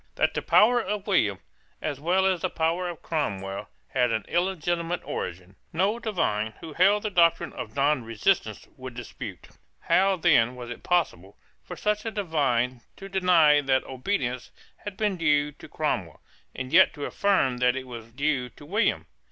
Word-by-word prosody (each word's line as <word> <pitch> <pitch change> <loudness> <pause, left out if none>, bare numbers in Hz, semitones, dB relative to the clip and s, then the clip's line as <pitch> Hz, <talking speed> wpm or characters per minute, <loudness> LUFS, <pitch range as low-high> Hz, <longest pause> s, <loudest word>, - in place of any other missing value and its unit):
That - - +1
the - - -2
power 240 +3 +5
of 205 -1 -4
William, 105 - +2 0.4
as 140 - -4
well 180 +5 +2
as 185 -3 +1
the 185 - 0
power 170 +2 -1
of 170 - -9
Cromwell, 100 - -3 0.2
had 125 -2 +1
an 110 -2 -1
illegitimate 175 -1 -1
origin, 90 +2 -6
no 195 +7 +1
divine 110 - -1
who 160 -2 -9
held 200 +5 +3
the 215 - -2
doctrine 170 -3 +3
of - - -7
nonresistance 140 - 0
would 130 -2 -8
dispute. 120 -5 -8 0.3
How 195 +1 +3
then 150 -9 +3
was 120 -1 -8
it 120 - -8
possible 130 - -1 0.2
for - - -9
such 210 0 -1
a 225 - -2
divine 140 - 0
to 195 - -10
deny 175 -6 +4
that 135 -1 +1
obedience 130 -3 -3 0.3
had 205 -2 -8
been 210 -3 0
due 150 -3 +2
to - - -14
Cromwell, - - -3 0.3
and 130 +1 -6
yet 185 +2 +6
to 145 - -4
affirm 185 -11 +1
that 125 0 +2
it 135 0 -5
was 115 -2 -9
due 135 -1 -1
to 145 - -15
William? 205 +7 0
155 Hz, 170 wpm, -26 LUFS, 125-190 Hz, 0.4 s, yet